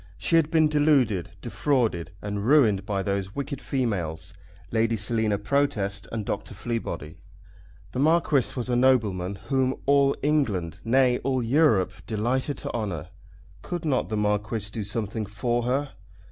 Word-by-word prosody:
She 170 - +1
had 160 -2 +4
been 160 -1 +4
deluded, 140 - +2
defrauded, 115 - 0
and 105 0 -3
ruined 110 -7 +4
by 100 -2 -1
those 100 0 -2
wicked 140 -1 -4
females, 90 - -2 0.4
Lady 115 0 +1
Selina 110 0 0
Protest 105 -4 0
and 110 -2 -3
Dr. - - -4
Fleabody. 85 -10 -4 0.7
The 125 - -4
Marquis 155 -3 +2
was 125 - -2
a 125 - +1
nobleman 105 -8 +2
whom 130 -1 +2
all 140 0 +4
England, 105 - 0
nay, 125 +1 +3
all 130 -1 -1
Europe, 115 - +3
delighted 125 +6 -1
to - - -5
honour. 100 -10 -3 0.5
Could 175 - -5
not 135 -5 0
the 110 - -1
Marquis 105 0 -1
do 110 - -4
something 110 0 -3
for 120 +3 -1
her? 135 +3 0
115 Hz, 145 wpm, -26 LUFS, 100-135 Hz, 0.7 s, had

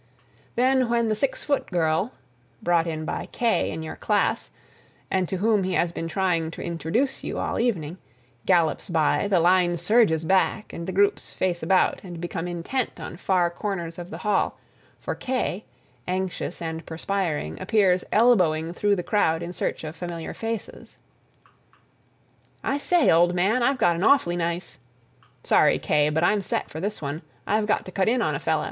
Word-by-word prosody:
Then 255 0 +3
when 235 -1 +2
the 215 - +1
six 265 +5 -1
foot 285 -1 0
girl 170 +5 0 0.5
(brought 170 -1 +3 0.2
by - - -4
Kaye 235 -2 +1
in 160 0 -5
your 160 - -6
class, 210 -2 0 0.6
and 185 -2 +1
to 190 - -2
whom 210 0 +2
he 185 0 -1
has 170 - +1
been 165 -1 -4
trying 170 -2 0
to - - -5
introduce 170 - -1
you - - -4
all - - -2
evening) 185 -8 -1 0.5
gallops 170 -4 +2
by, 160 +5 +2
the 195 -3 +3
line 175 0 +3
surges 175 -3 +3
back 195 +4 +1
and 170 - -6
the - - -2
groups 200 +2 +1
face 180 -2 -1
about 185 +3 +2
and 175 -3 -8
become 175 0 -4
intent 175 +7 -3
on 160 +1 -7
far 180 -1 +1
corners 175 -3 -4
of 175 0 -7
the - - -7
hall, 210 -2 0 0.4
for - - -4
Kaye, 250 -6 -2 0.4
anxious 185 -1 -3
and 160 0 -4
perspiring, 160 - -2
appears 190 -5 +3
elbowing 175 -8 +3
through 205 +3 +2
the 175 - -3
crowd 165 -6 +1
in 175 +1 -6
search - - -3
of 155 +1 -6
familiar 170 -1 -5
faces. 225 -1 -6 1.7
"I 280 - 0
say, 345 +1 +3
old 175 +2 +4
man, 200 +8 +2
I've 270 +3 +2
got 175 -7 +3
an 175 - -2
awfully 210 -10 +4
nice—" 170 -6 -3 0.6
"Sorry, - - +4
Kaye, 150 0 +2
but 160 +2 0
I'm 205 +3 +3
set - - -3
for 155 - -6
this 205 0 -4
one. 145 +3 -4 0.2
I've 210 0 +1
got 215 - +1
to 185 - -8
cut 190 +2 +1
in 245 0 +2
on - - 0
a - - -2
fella." - - +1
180 Hz, 175 wpm, -25 LUFS, 165-210 Hz, 1.7 s, old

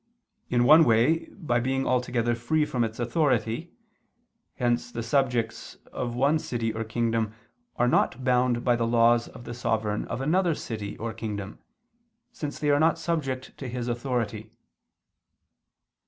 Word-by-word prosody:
In 120 -1 +3
one 155 +6 +8
way, 120 +6 +3
by 135 -11 -1
being 135 +2 -1
altogether 125 -2 +1
free 135 +7 +1
from 125 -5 -1
its 110 0 -3
authority: 120 +2 0 0.8
hence 120 -1 0
the 115 -1 -4
subjects 120 -2 -1 0.2
of 120 -1 -3
one 140 +5 +3
city 115 -6 -2
or 115 0 -3
kingdom 115 -1 -1 0.4
are 120 - +2
not 130 +1 +1
bound 125 -1 +2
by 120 -1 +3
the 115 -1 0
laws 115 0 +4
of - - -12
the 120 - -7
sovereign 110 -3 -1
of - - -4
another 165 +4 +2
city 105 -6 -6
or 115 0 -4
kingdom, 105 -2 -6 0.7
since 150 -2 -5
they 150 -1 +1
are 145 - +4
not 160 +2 +3
subject 145 -6 -3
to 135 - -5
his 125 0 -4
authority. 120 -3 -2
120 Hz, 150 wpm, -26 LUFS, 115-135 Hz, 0.8 s, one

